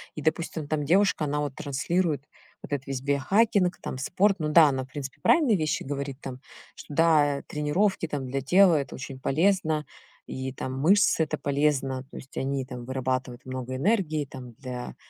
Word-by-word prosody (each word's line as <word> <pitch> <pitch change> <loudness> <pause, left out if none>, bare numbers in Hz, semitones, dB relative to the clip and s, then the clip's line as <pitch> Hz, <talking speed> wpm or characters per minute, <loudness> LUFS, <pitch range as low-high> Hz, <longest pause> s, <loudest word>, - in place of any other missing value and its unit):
И, 150 - -6
допустим, 160 -1 -1
там 150 -2 -1
девушка, 175 -1 +3
она 150 0 -1
вот 145 -3 -3
транслирует 150 +2 -1 0.4
вот - - -10
этот 140 0 -3
весь 135 -1 -3
биохакинг, 185 - +2
там 130 - -6
спорт. 195 +8 +2
Ну 155 - -1
да, 155 -1 +7
она 130 -1 -2
в - - -21
принципе 135 -1 -7
правильные 285 -10 +4
вещи 155 -4 -1
говорит 140 -1 -4
там, 130 -3 -7 0.3
что 145 - -10
да, 150 -4 +3
тренировки 165 +5 0
там 145 -3 -3
для 135 +2 -2
тела- 180 +6 +5
это - - -8
очень 130 0 -8
полезно, 155 0 +1 0.4
и 130 0 -5
там 130 0 -5
мышцы- 195 +2 +4
это - - -3
полезно, 140 -2 0
то - - -10
есть 135 - -12
они 135 -1 -1
там 125 -2 -8
вырабатывают 130 -1 -3
много 130 0 -5
энергии 155 - +1
там 130 -3 -10
для 125 0 -7
145 Hz, 180 wpm, -27 LUFS, 130-165 Hz, 0.4 s, да